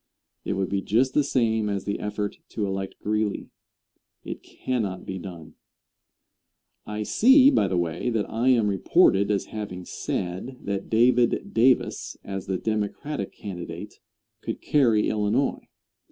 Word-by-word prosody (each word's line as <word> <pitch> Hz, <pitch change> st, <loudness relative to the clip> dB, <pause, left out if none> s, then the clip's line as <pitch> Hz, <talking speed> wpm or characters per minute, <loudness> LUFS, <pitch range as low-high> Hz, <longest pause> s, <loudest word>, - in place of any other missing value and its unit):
It -, -, -2 dB
would 95 Hz, -1 st, -1 dB
be 100 Hz, 0 st, 0 dB
just 125 Hz, +7 st, +2 dB
the 150 Hz, -, +3 dB
same 110 Hz, -5 st, +1 dB
as 100 Hz, -1 st, -2 dB
the 100 Hz, -, -2 dB
effort 105 Hz, -1 st, -3 dB
to 105 Hz, -, -2 dB
elect 95 Hz, 0 st, -3 dB
Greeley. 105 Hz, 0 st, -1 dB, 0.7 s
It -, -, -6 dB
cannot 105 Hz, -8 st, -3 dB
be 95 Hz, 0 st, -5 dB
done. 85 Hz, -4 st, -9 dB, 1.3 s
I 105 Hz, 0 st, -3 dB
see, 265 Hz, -, +6 dB
by 100 Hz, -, +3 dB
the 95 Hz, -1 st, -1 dB
way, 85 Hz, +6 st, -1 dB
that 110 Hz, -3 st, -1 dB
I 115 Hz, +3 st, -1 dB
am 115 Hz, -5 st, +4 dB
reported 100 Hz, 0 st, +3 dB
as 100 Hz, -2 st, 0 dB
having 95 Hz, -4 st, -5 dB
said 95 Hz, +9 st, -4 dB
that 100 Hz, -1 st, -3 dB
David 120 Hz, +1 st, +3 dB
Davis, 125 Hz, +3 st, +2 dB
as 95 Hz, -1 st, -5 dB
the 95 Hz, -1 st, 0 dB
Democratic 110 Hz, +3 st, -3 dB
candidate, 90 Hz, 0 st, -8 dB, 0.4 s
could 115 Hz, -, -4 dB
carry 120 Hz, -8 st, +3 dB
Illinois. 110 Hz, +6 st, 0 dB
105 Hz, 140 wpm, -25 LUFS, 95-120 Hz, 1.3 s, see